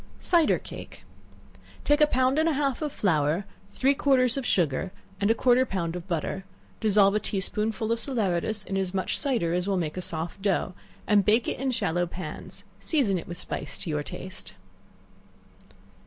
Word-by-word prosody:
Cider 340 -4 +4
Cake. - - -10 0.8
Take 295 +1 +3
a 300 - +7
pound 260 +1 +2
and 320 +1 +3
a - - +1
half 275 -2 0
of 300 -2 -1
flour, 165 - +1 0.2
three 270 +1 +2
quarters 260 -3 +3
of 270 -3 -2
sugar, 175 +1 +1 0.3
and 200 +1 +2
a 225 - +4
quarter 250 +2 +4
of 260 - +1
a - - -19
pound 170 -3 -1
of 180 +1 -7
butter; 180 +2 -2 0.4
dissolve 205 -2 +4
a 210 - +2
tea 200 - -2
spoonful 215 +3 -2
of 230 - +1
salaeratus 215 -4 -1
in 195 - -2
as 190 -1 -2
much 190 - -1
cider 230 -12 +1
as 180 +2 0
will 195 -1 +1
make 160 -4 -1
it - - -3
a - - -3
soft 165 +2 -4
dough, 190 -2 0 0.3
and 205 -2 +4
bake 220 +4 +3
it - - -2
in 270 0 0
shallow 175 -7 0
pans; 170 -3 -8 0.2
season 235 - +2
it - - -10
with 175 - -6
spice 140 -3 -4
to 165 - -3
your 150 -1 0
taste. 185 +5 -7
200 Hz, 195 wpm, -27 LUFS, 175-255 Hz, 0.8 s, a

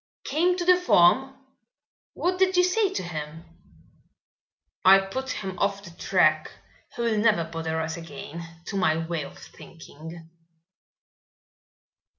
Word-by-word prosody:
"Came 350 +5 +1
to 350 - -2
the 360 0 +6
farm? 265 - +4 0.8
What 365 +1 -1
did 375 -1 +3
you 360 - +6
say 390 +2 +1
to 385 - -3
him?" 160 -1 -7 1.4
"I 190 +1 +8
put 225 +8 -4
him 190 -6 -5
off 200 0 -1
the 170 - -11
track. 155 -3 +1 0.4
He 235 - -3
will 225 -2 +1
never 210 -6 +3
bother 160 0 -4
us 160 +1 -3
again, 165 0 -8 0.2
to 200 - -4
my 160 -4 +2
way 165 -1 -3
of - - -11
thinking." 160 0 -12
185 Hz, 135 wpm, -25 LUFS, 160-265 Hz, 1.4 s, I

